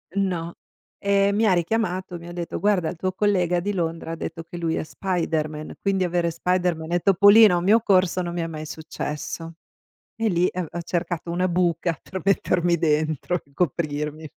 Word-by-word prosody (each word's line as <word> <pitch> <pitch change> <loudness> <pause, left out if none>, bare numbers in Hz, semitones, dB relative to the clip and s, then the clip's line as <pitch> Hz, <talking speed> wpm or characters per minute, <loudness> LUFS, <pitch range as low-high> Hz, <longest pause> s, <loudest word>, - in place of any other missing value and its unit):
No, 175 -4 -1 0.4
e 200 0 +3
mi 220 +2 +2
ha 200 - +4
richiamato. 180 0 -1
Mi 170 0 -11
ha - - -7
detto: 175 -1 -4
"Guarda, 185 -3 +2
il - - -6
tuo 185 +3 -2
collega 185 -3 +1
di 205 +4 -2
Londra, 165 -3 -3
ha - - -3
detto 165 0 -6
che 170 +1 -9
lui 165 -1 -1
è - - -2
Spiderman, 155 -4 -3
quindi 195 -2 +1
avere 170 -1 0
Spiderman 170 -1 -1
e 175 - +3
Topolino 200 +2 +7
a - - +2
un 175 - -2
mio 220 +4 +5
corso, 185 -3 +3
non 175 -1 -4
mi 175 - -2
è 165 - -2
mai 155 -1 -6
successo". 160 +1 -6 0.6
E 225 0 0
lì, 175 -2 +2
ehm, 180 0 -3
v - - -14
ho 170 - -3
cercato 170 0 -3
una 180 +2 0
buca, 170 -2 0
per 190 - -7
mettermi 175 -3 +2
dentro 155 +2 0
e 140 - -27
coprirmi. 150 -1 -2
175 Hz, 195 wpm, -24 LUFS, 165-185 Hz, 0.6 s, Topolino